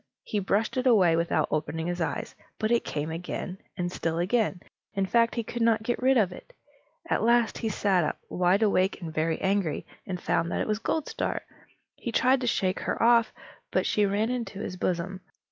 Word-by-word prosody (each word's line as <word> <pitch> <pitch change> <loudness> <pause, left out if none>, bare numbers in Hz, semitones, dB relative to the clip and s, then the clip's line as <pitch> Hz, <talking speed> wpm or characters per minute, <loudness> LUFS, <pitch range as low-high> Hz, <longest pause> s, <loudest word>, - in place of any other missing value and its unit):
He 210 - -2
brushed 205 +5 0
it 255 +1 +1
away 185 -9 +5
without 170 +1 +1
opening 160 +1 -2
his 175 0 -2
eyes, - - -2 0.2
but 215 +1 -1
it 235 - +3
came 150 +1 -3
again, 180 +2 -5 0.2
and 175 -1 -2
still 165 -2 -2
again. 190 +1 0 0.3
In 195 -1 +1
fact, 230 +3 +2
he 235 - -1
could 240 +2 -5
not 225 -1 +3
get 240 +1 -1
rid 260 +1 +4
of 200 -6 +3
it. - - -12 0.5
At - - +1
last 235 0 +3
he 225 - -1
sat 195 -4 +2
up, 150 - -2
wide 180 +4 +2
awake 195 -2 +2
and 165 -4 -6
very 160 +1 0
angry, 190 -5 0 0.2
and 180 -2 -3
found 170 0 0
that - - -1
it - - -2
was 215 0 0
Goldstar. 310 +6 -2 0.5
He 235 - -5
tried 255 +3 +3
to 245 - -1
shake 190 -5 +1
her - - -2
off, 230 -1 +5 0.4
but - - +1
she 210 -1 +2
ran 210 +4 0
into 235 -5 -4
his 185 - -4
bosom. 185 +1 -2
200 Hz, 200 wpm, -27 LUFS, 175-230 Hz, 0.5 s, away